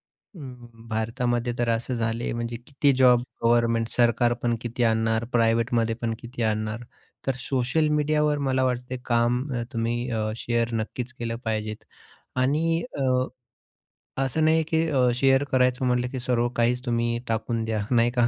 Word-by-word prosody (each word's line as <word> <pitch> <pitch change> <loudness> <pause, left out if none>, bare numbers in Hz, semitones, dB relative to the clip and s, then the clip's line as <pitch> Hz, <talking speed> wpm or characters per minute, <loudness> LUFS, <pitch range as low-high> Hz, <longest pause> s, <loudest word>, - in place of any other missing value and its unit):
अं, 130 - -12 0.2
भारतामध्ये 120 +2 -1
तर 120 -1 0
असं 115 +2 0
झालं 115 0 -1
आहे, - - -1
म्हणजे 120 0 -3
किती 140 0 +2
जॉब 125 -2 +6 0.2
गव्हर्नमेंट, 115 -1 +3
सरकारपण 120 0 +2
किती 120 +1 -3
आणणार, 110 0 +1
प्रायव्हेटमध्ये 115 0 +2
पण 115 -1 -1
किती 120 0 -5
आणणार? 110 +1 -1 0.4
तर 135 - +2
सोशल 130 +4 0
मीडियावर 150 0 +2
मला 130 0 +2
वाटतं, 125 0 -2
काम 120 +1 +2
अ, 120 -1 -1
तुम्ही 120 +1 -1 0.3
शेअर 115 0 -1
नक्कीच 115 +3 -3
केलं 115 -1 -3
पाहिजेत. 110 -1 -3 0.5
आणि 155 +6 +1 0.2
अ, - - 0 1.2
असं 135 +4 0
नाही, 160 +1 +4
की 160 0 +1
अ, 130 -4 +3
शेअर 135 +1 +3
करायचं 125 0 +2
म्हटलं, 125 0 +1
की 130 - -4
सर्व 120 -1 +1
काहीच 125 +2 +1
तुम्ही 120 -1 0
टाकून 115 +1 -1
द्या 110 -2 -2
नाही 120 -1 +3
का. 120 -1 +3
120 Hz, 150 wpm, -25 LUFS, 115-130 Hz, 1.2 s, जॉब